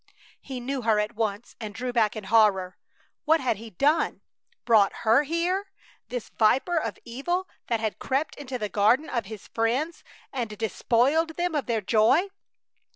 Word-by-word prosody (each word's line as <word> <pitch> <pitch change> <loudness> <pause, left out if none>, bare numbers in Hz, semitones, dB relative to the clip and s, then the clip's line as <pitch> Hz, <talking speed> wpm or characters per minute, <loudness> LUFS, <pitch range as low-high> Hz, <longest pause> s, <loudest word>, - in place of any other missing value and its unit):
He 260 -2 -6
knew 260 +2 -3
her 220 -2 +2
at 210 +2 -1
once 215 0 -3
and 215 -3 -7
drew 250 +2 -3
back 225 -3 +2
in 215 - -6
horror. 190 -3 +3 0.5
What 320 +1 +4
had 250 -6 0
he 225 +2 -9
done! 290 - +1 0.4
Brought 215 -4 +5
her 225 +5 +6
here, 345 +6 -1 0.4
this 245 -3 -5
viper 260 +10 +2
of 320 - -1
evil 345 +10 -2 0.2
that 230 -2 0
had 220 -1 -3
crept 275 +4 -1
into 265 -3 -6
the 215 -3 -2
garden 215 +9 +2
of 230 -5 -2
his 215 -1 -9
friends 250 +9 -1 0.3
and 230 -5 -3
despoiled 260 +9 +1
them 350 -1 0
of 290 -7 -1
their 230 -2 0
joy! 225 - +3
240 Hz, 165 wpm, -26 LUFS, 215-290 Hz, 0.5 s, her